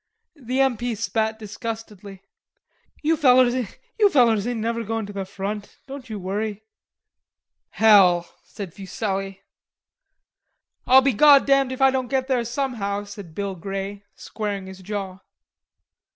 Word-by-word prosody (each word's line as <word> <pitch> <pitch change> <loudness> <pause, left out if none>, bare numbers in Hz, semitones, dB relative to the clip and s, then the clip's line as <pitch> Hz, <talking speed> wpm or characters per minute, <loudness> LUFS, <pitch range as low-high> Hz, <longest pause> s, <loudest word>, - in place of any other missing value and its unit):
The 260 -2 -2
M. 265 -4 +2
P. 240 +1 -3
spat 220 +1 -1
disgustedly. 210 -3 -8 0.8
"You 320 +2 +3
fellers 255 -4 +5
ain't 245 - +1
never 230 +1 -2
goin' 225 0 -3
to 205 - -9
the 195 -1 -4
front, 200 +2 -6
don't 270 -2 -9
you 215 - -5
worry." 205 +2 -4 1.1
"Hell!" 185 -6 +5 0.2
said 195 -5 -9
Fuselli. 195 -1 -4 1.4
"I'll 260 +1 +7
be 270 -1 +2
goddamned 275 +1 +5
if 260 +1 -1
I 270 - +6
don't 260 -1 -2
get 260 0 -1
there 255 -3 +1
somehow," 230 -5 -3
said 200 -5 -11
Bill 200 -1 -3
Grey, 195 +2 -6
squaring 205 -3 -5
his 190 0 -10
jaw. 195 -1 -5
220 Hz, 125 wpm, -23 LUFS, 200-255 Hz, 1.4 s, I'll